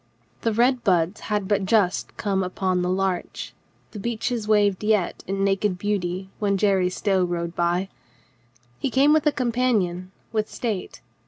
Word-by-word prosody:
The 230 - +1
red 245 +3 +2
buds 180 0 +2
had 205 -2 0
but 205 -1 +1
just 195 -2 +1
come 195 -3 0
upon 185 0 -1
the 180 - 0
larch, 185 -1 -2 0.4
the 210 - -7
beeches 235 +1 -2
waved 205 -2 +3
yet 210 -4 +1
in 195 +1 -1
naked 195 -1 +1
beauty 190 -2 -2
when 200 -2 +1
Jerry 190 -2 +2
Stow 190 0 +1
rode 170 -1 -2
by. 175 +2 +1 0.9
He - - -1
came 275 +4 +4
with 310 -1 +3
a - - +5
companion, 230 -9 0 0.2
with 215 -1 -1
state. 215 -6 -4
200 Hz, 155 wpm, -24 LUFS, 185-220 Hz, 0.9 s, a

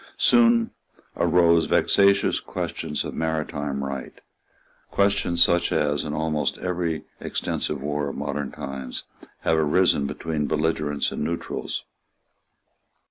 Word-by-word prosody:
Soon 235 -1 +4 0.4
arose 85 -2 +4
vexatious 100 0 +3
questions 75 - -4
of - - -5
maritime 75 -3 -2
right, 70 -1 -6 0.7
questions 100 -4 +3
such 85 +1 +2
as, 75 -1 +1
in 75 - -4
almost 75 0 -1
every 85 -3 -2 0.2
extensive 75 - -2
war 75 0 -1
of - - -7
modern 70 0 -3
times, 65 -2 -6 0.4
have 80 -1 +2
arisen 75 -2 +3
between 75 0 -2
belligerents 75 -2 0
and - - -3
neutrals. 85 +2 -3
80 Hz, 110 wpm, -24 LUFS, 75-85 Hz, 0.7 s, Soon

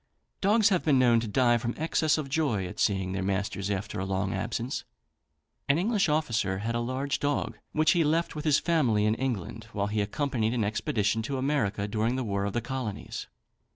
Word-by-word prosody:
Dogs 210 +2 +4
have 185 -4 +1
been 145 -4 +4
known 120 -2 +5
to 115 - -3
die 120 +2 +3
from 120 +1 -3
excess 155 0 +1
of 155 -3 -3
joy 135 - 0
at 90 - -8
seeing 95 -3 +1
their 95 0 -2
masters 100 +1 -2
after 100 0 -3
a - - -1
long 95 0 -1
absence. 115 +6 -3 0.9
An 140 - +4
English 200 0 +1
officer 115 -11 0
had 110 +4 -2
a 120 - 0
large 130 +4 -2
dog, 145 0 -1
which 155 +1 +3
he 170 -2 +3
left 165 +3 +1
with 150 - -4
his 150 -2 +5
family 125 -12 +2
in 110 - +3
England, 115 -3 -3
while 100 -1 0
he 105 +1 -1
accompanied 115 +1 -1
an 115 - +1
expedition 105 +1 0
to 135 +5 -3
America 115 -7 0
during 110 +3 0
the 130 - -1
war 100 -3 -1
of 100 - -3
the 120 - 0
Colonies. 120 -4 -5
120 Hz, 200 wpm, -28 LUFS, 105-145 Hz, 0.9 s, known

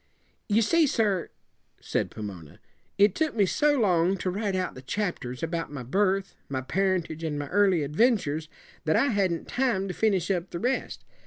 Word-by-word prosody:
"You 215 +2 +4
see, 320 +8 +4
sir," 205 -8 +1 0.5
said - - -1
Pomona, 95 -8 -8 0.4
"it 200 -1 +5
took 315 -4 -1
me 205 -3 +4
so 290 +8 +2
long 185 -3 +3
to 185 - -2
write 200 0 -2
out 185 -1 -1
the 130 - -10
chapters 135 -6 -3
about 165 -1 -2
my 140 -4 -6
birth, 195 - 0 0.2
my 130 -1 -2
parentage, 175 0 -1
and 155 -2 -2
my 145 0 -4
early 190 -5 +3
adventures, 155 - +1 0.4
that 155 0 +2
I 280 - +3
hadn't 190 -7 0
time 240 -7 0
to - - -3
finish 200 -4 +1
up 180 -1 -1
the - - -5
rest. 250 +6 -2
185 Hz, 175 wpm, -27 LUFS, 160-210 Hz, 0.5 s, it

